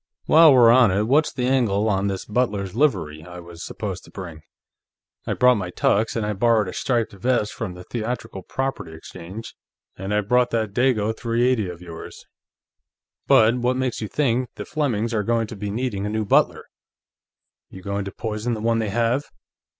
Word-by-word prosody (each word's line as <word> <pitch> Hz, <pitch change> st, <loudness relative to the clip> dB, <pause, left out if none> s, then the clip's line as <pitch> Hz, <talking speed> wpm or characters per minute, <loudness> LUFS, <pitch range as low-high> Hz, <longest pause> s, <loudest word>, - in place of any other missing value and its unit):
"While 160 Hz, -3 st, +7 dB
we're 120 Hz, -2 st, +7 dB
on 120 Hz, -3 st, +6 dB
it, 100 Hz, +3 st, +1 dB
what's 145 Hz, +7 st, +2 dB
the 125 Hz, -, -2 dB
angle 115 Hz, -6 st, +1 dB
on 100 Hz, -1 st, +1 dB
this 95 Hz, -1 st, -3 dB
butler's 105 Hz, -4 st, -1 dB
livery 90 Hz, -, 0 dB
I 90 Hz, +1 st, -10 dB
was 85 Hz, -1 st, -10 dB
supposed -, -, -5 dB
to -, -, -16 dB
bring? 85 Hz, -5 st, -9 dB, 0.9 s
I -, -, 0 dB
brought 125 Hz, -1 st, +4 dB
my 90 Hz, -2 st, -4 dB
tux, 105 Hz, +4 st, +1 dB
and 115 Hz, -2 st, -1 dB
I 105 Hz, -, -1 dB
borrowed 110 Hz, 0 st, +2 dB
a 90 Hz, -, -6 dB
striped 120 Hz, -4 st, -1 dB
vest 105 Hz, +1 st, 0 dB
from 95 Hz, -6 st, -5 dB
the 90 Hz, -, -10 dB
Theatrical 115 Hz, -1 st, -5 dB
Property 135 Hz, -7 st, -4 dB
Exchange, 90 Hz, +7 st, -9 dB, 0.4 s
and 95 Hz, +2 st, -6 dB
I 105 Hz, 0 st, +2 dB
brought 125 Hz, +4 st, +2 dB
that 110 Hz, -3 st, -2 dB
Dago 110 Hz, -3 st, +1 dB
.380 115 Hz, -3 st, 0 dB
of 85 Hz, 0 st, -12 dB
yours. 85 Hz, -2 st, -10 dB, 1.0 s
But 110 Hz, +3 st, +5 dB
what 125 Hz, +1 st, 0 dB
makes 130 Hz, -3 st, -2 dB
you 110 Hz, -, -3 dB
think 125 Hz, -1 st, 0 dB
the -, -, -7 dB
Flemings 120 Hz, -7 st, -1 dB
are 110 Hz, -, +1 dB
going 115 Hz, +2 st, 0 dB
to 110 Hz, -, -9 dB
be 105 Hz, 0 st, -5 dB
needing 105 Hz, -2 st, -2 dB
a -, -, -2 dB
new 110 Hz, 0 st, -2 dB
butler? -, -, +2 dB, 1.0 s
You 95 Hz, -, -12 dB
going 100 Hz, 0 st, -3 dB
to 100 Hz, -, -5 dB
poison 110 Hz, +3 st, -3 dB
the -, -, -6 dB
one 115 Hz, 0 st, +1 dB
they 110 Hz, -2 st, -1 dB
have?" 120 Hz, +6 st, 0 dB
110 Hz, 190 wpm, -23 LUFS, 100-125 Hz, 1.0 s, While